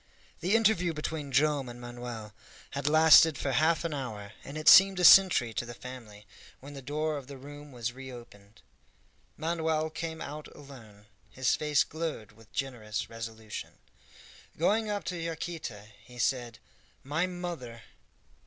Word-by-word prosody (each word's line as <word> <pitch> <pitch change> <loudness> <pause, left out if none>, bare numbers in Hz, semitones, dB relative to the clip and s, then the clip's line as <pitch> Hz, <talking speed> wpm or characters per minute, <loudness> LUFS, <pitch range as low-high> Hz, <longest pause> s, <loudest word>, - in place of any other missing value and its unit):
The 190 +5 +1
interview 200 -7 +3
between 150 -2 -4
Joam 140 -1 +2
and 120 0 -10
Manoel 120 -3 -8 0.4
had 140 0 -3
lasted 160 -1 +7
for 135 - -2
half 160 +6 +2
an 165 - -2
hour, 110 -8 -6
and 140 +3 -8
it 155 +1 -5
seemed 195 -1 +8
a - - 0
century 175 -11 +7
to 110 - -2
the 120 0 -9
family, 115 -5 -11 0.3
when 140 +2 -11
the 140 - -8
door 150 +3 -2
of 135 -3 -9
the 140 -1 -9
room 145 +2 -11
was 120 -1 -4
reopened. 120 -6 -12 0.7
Manoel 160 -1 -1
came 160 0 -5
out 150 +1 -7
alone; 110 -8 -14 0.2
his 130 -1 0
face 150 -2 +2
glowed 160 -9 -5
with 115 +1 -20
generous 115 -7 -4
resolution. 110 -1 -7 0.8
Going 210 +6 +1
up 205 -1 -2
to 180 - -4
Yaquita, 160 -10 -6
he 125 +1 -15
said, 120 -1 -1 0.5
"My 155 +6 0
mother!" 170 -11 -7
140 Hz, 150 wpm, -29 LUFS, 120-160 Hz, 0.8 s, seemed